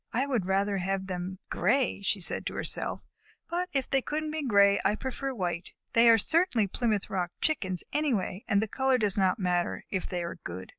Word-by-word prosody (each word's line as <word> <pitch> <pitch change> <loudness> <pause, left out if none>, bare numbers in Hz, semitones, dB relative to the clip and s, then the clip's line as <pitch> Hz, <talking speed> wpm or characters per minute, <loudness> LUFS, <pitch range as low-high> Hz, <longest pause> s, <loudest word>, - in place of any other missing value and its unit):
"I 255 +4 +2
would 240 -10 -1
rather 195 +1 +1
have 190 +1 -1
had 190 - -9
them 180 +1 -3 0.2
gray," 235 +4 +1
she 200 +1 0
said 175 - -1
to - - -4
herself, - - -3 0.5
"but 360 +1 -1
if 270 -2 0
they 270 -1 +2
couldn't 305 +3 -3
be 310 0 -2
gray, 200 -6 +5
I 205 - +2
prefer 265 +3 -4
white. 180 -7 -3 0.2
They 230 0 +6
are 225 - +8
certainly 320 - +2
Plymouth 210 +1 -1
Rock 180 -3 -1
Chickens 185 - 0
anyway, 225 -10 0
and 200 0 +3
the - - -2
color 265 +3 +2
does 210 -5 0
not 190 -2 +2
matter, 180 -2 -1
if 190 -2 -2
they 180 -2 -2
are 170 - -6
good." 90 +2 -7
205 Hz, 205 wpm, -29 LUFS, 185-265 Hz, 0.5 s, are